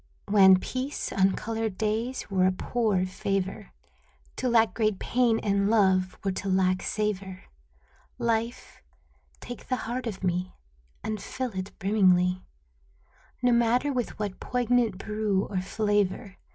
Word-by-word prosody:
Wan 195 -2 +7
peace, 260 +8 -4
uncolored 215 +2 0
days, 225 +4 -2
were 185 -1 +3
a - - +3
poor 205 -1 0
favor; 195 +2 -3 0.7
To 255 - 0
lack 225 -2 +4
great 215 -3 +1
pain 240 0 +2
and 200 0 +1
love 190 -4 +3
were 195 - 0
to 195 +1 -4
lack 185 0 +2
savor. 195 -3 -3 0.7
Life, 235 0 -2 0.6
take 245 - -9
the 255 - +1
heart 245 +2 -3
of 195 -4 -6
me 180 0 -1 0.5
And 215 -2 -3
fill 255 +3 -4
it 190 0 -5
brimmingly, 185 -3 +3 1.0
No 245 - +4
matter 240 +4 +2
with 245 -3 -3
what 205 -3 -4
poignant 245 -4 +1
brew 210 -1 -1
or 190 -3 -2
flavor. 205 0 -1
210 Hz, 130 wpm, -27 LUFS, 190-230 Hz, 1.0 s, Wan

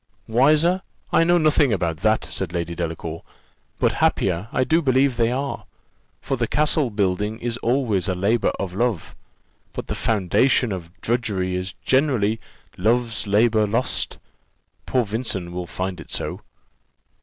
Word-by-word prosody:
"Wiser! 155 +10 +3 0.3
I - - +5
know 175 +1 +4
nothing 155 -4 +3
about 85 -5 0
that," 110 +5 +1
said 95 -3 -5
Lady 85 -1 -2
Delacour; 85 -1 -4 0.6
"but - - +2
happier 90 +1 +1
I - - +2
do 160 +5 +2
believe 130 -2 +3
they 115 0 +2
are; 135 +2 -3 0.5
for 135 - -2
the 120 -1 0
castle 150 -1 +2
building 105 +1 -1
is 120 0 -3
always 120 -7 +1
a 95 - 0
labour 105 +5 +2
of 95 -2 -3
love, 110 -4 -1 0.6
but - - -5
the - - -3
foundation 110 +4 +2
of 90 -3 -5
drudgery 105 -6 -1
is 90 +1 -4
generally 125 -6 +2 0.4
love's 115 +2 +1
labour 110 +1 +3
lost. 115 +5 -1 0.7
Poor 130 -1 +2
Vincent 105 -5 -3
will 90 0 -5
find 90 +1 -4
it - - -13
so." - - -3
110 Hz, 145 wpm, -23 LUFS, 95-130 Hz, 0.7 s, I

